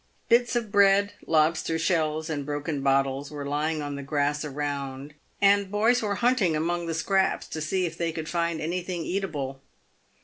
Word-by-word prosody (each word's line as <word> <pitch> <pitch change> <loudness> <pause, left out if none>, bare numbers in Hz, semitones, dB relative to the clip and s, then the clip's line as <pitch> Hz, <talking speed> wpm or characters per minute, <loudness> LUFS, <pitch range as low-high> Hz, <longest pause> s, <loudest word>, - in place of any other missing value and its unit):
Bits 240 +1 +4
of 230 -4 -1
bread, 200 0 +4
lobster 160 +1 +2
shells, 160 -2 0
and 150 -3 -3
broken 145 0 -3
bottles, 135 0 +1
were 145 -2 -6
lying 150 +2 -1
on 145 0 -4
the 140 - -5
grass 145 +1 0
around, 140 -1 -4 0.3
and 200 -1 +4
boys 220 +4 +3
were 205 -2 -1
hunting 235 -7 +2
among 170 +2 -1
the 165 - -2
scraps 190 +3 +1
to 155 - -5
see 180 +4 0
if 165 -1 -6
they 170 -1 0
could 160 -1 -5
find 170 -1 -1
anything 175 +1 -3
eatable. 150 -9 -3
160 Hz, 170 wpm, -26 LUFS, 145-190 Hz, 0.3 s, Bits